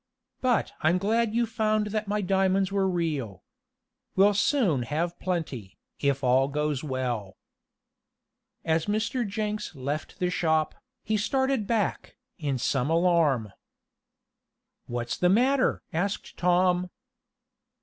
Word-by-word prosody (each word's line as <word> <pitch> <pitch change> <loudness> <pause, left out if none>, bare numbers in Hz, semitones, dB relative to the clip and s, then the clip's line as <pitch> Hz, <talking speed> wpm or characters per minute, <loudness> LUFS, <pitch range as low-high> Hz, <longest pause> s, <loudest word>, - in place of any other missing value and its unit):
"But 250 -2 +1
I'm 160 +3 +3
glad 220 +3 +1
you 235 0 +3
found 215 -2 0
that 215 -1 -2
my 210 +1 0
diamonds 190 0 +2
were 195 -1 +1
real. 145 - -2 0.7
We'll 200 +2 +5
soon 205 - +2
have 165 +8 -2
plenty, 150 - -4 0.2
if 140 -1 0
all 130 +2 +4
goes 150 -1 -1
well." 125 -8 -3 1.3
As 160 +1 +1
Mr. 215 +3 0
Jenks 210 -2 -3
left 140 +3 -4
the 180 -2 0
shop, 160 -3 +1 0.3
he 215 - 0
started 265 0 0
back, 220 -4 -1 0.2
in 140 -4 -1
some 130 +2 0
alarm. 165 - +2 1.3
"What's 120 0 -3
the 180 - +3
matter?" 255 +7 +3
asked 195 +5 -2
Tom. 180 0 +2
180 Hz, 120 wpm, -27 LUFS, 145-210 Hz, 1.3 s, We'll